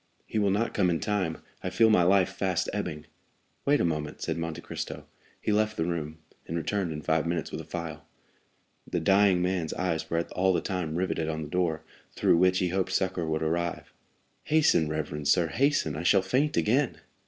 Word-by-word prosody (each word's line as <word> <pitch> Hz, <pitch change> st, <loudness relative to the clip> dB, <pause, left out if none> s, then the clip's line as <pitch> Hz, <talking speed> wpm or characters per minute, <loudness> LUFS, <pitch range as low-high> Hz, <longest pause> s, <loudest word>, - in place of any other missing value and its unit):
"He 110 Hz, -, -2 dB
will 100 Hz, -1 st, +2 dB
not 105 Hz, +4 st, 0 dB
come 95 Hz, -3 st, +2 dB
in 85 Hz, -2 st, +1 dB
time; 100 Hz, -6 st, -2 dB, 0.2 s
I -, -, -1 dB
feel 110 Hz, -1 st, +4 dB
my 100 Hz, -, +5 dB
life 95 Hz, +1 st, +4 dB
fast 95 Hz, -3 st, -1 dB
ebbing." 75 Hz, 0 st, -4 dB, 0.6 s
"Wait 145 Hz, +1 st, +4 dB
a -, -, +2 dB
moment," 75 Hz, -2 st, -2 dB
said -, -, -2 dB
Monte 85 Hz, -1 st, -4 dB
Cristo. -, -, -6 dB, 0.3 s
He -, -, -1 dB
left 105 Hz, +1 st, +1 dB
the 80 Hz, -, 0 dB
room, 80 Hz, -3 st, -3 dB, 0.3 s
and 80 Hz, -, -3 dB
returned 90 Hz, +2 st, -1 dB
in 75 Hz, -1 st, -6 dB
five 80 Hz, +1 st, +1 dB
minutes 85 Hz, -1 st, -2 dB
with -, -, -4 dB
a -, -, -11 dB
phial. 80 Hz, -4 st, -6 dB, 0.8 s
The -, -, 0 dB
dying 95 Hz, +1 st, +4 dB
man's 90 Hz, -3 st, -1 dB
eyes 85 Hz, -3 st, -2 dB
were 85 Hz, 0 st, +1 dB
all 95 Hz, +1 st, +2 dB
the -, -, +1 dB
time 90 Hz, -5 st, -3 dB
riveted 85 Hz, -3 st, -1 dB
on 80 Hz, 0 st, -3 dB
the 75 Hz, -, -7 dB
door, 85 Hz, -3 st, 0 dB, 0.3 s
through -, -, +3 dB
which 90 Hz, +1 st, +4 dB
he 90 Hz, -1 st, +1 dB
hoped 95 Hz, +1 st, -1 dB
succor 95 Hz, -3 st, 0 dB
would 80 Hz, 0 st, -1 dB
arrive. 85 Hz, +1 st, -2 dB, 0.5 s
"Hasten, 150 Hz, -, +3 dB
reverend 75 Hz, -1 st, -3 dB
sir, 85 Hz, 0 st, +3 dB
hasten! 135 Hz, -, +1 dB
I 75 Hz, -, -3 dB
shall 95 Hz, +2 st, +4 dB
faint 140 Hz, +10 st, +1 dB
again!" 130 Hz, +7 st, +2 dB
90 Hz, 200 wpm, -28 LUFS, 80-100 Hz, 0.8 s, my